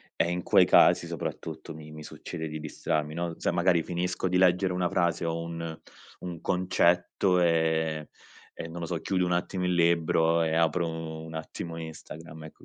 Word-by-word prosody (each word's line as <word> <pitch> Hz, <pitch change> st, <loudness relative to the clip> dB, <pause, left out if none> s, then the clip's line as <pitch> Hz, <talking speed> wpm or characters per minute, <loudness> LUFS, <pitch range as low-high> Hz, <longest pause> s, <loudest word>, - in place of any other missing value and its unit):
e 85 Hz, -, +1 dB
in 90 Hz, 0 st, -2 dB
quei -, -, +5 dB
casi, -, -, +5 dB
soprattutto, -, -, -6 dB
mi 75 Hz, 0 st, -11 dB
mi 75 Hz, 0 st, -9 dB
succede 80 Hz, +1 st, -6 dB
di 75 Hz, 0 st, -6 dB
distrarmi, 75 Hz, 0 st, -2 dB
no, 85 Hz, 0 st, -2 dB
sai -, -, 0 dB
magari 85 Hz, -1 st, +3 dB
finisco 90 Hz, +2 st, -2 dB
di 90 Hz, 0 st, +1 dB
leggere 90 Hz, 0 st, +3 dB
una 90 Hz, -1 st, 0 dB
frase 85 Hz, -1 st, 0 dB
o 85 Hz, 0 st, -2 dB
un 85 Hz, -1 st, -6 dB, 0.4 s
un 85 Hz, -2 st, -7 dB
concetto 90 Hz, +1 st, +2 dB
e 80 Hz, -2 st, +1 dB, 0.5 s
e 80 Hz, -, -6 dB
non 85 Hz, +1 st, -7 dB
lo -, -, -2 dB
so, 85 Hz, -1 st, -3 dB
chiudo 90 Hz, -2 st, 0 dB
un 90 Hz, -, -1 dB
attimo 90 Hz, +1 st, -1 dB
il 90 Hz, -, +1 dB
libro 85 Hz, -1 st, +3 dB
e 80 Hz, -, 0 dB
apro 85 Hz, +1 st, +2 dB, 0.4 s
un 80 Hz, -, -9 dB
attimo 80 Hz, +1 st, -6 dB
Instagram, 80 Hz, 0 st, -9 dB
ecco, 80 Hz, -, -13 dB
85 Hz, 180 wpm, -28 LUFS, 80-90 Hz, 0.5 s, quei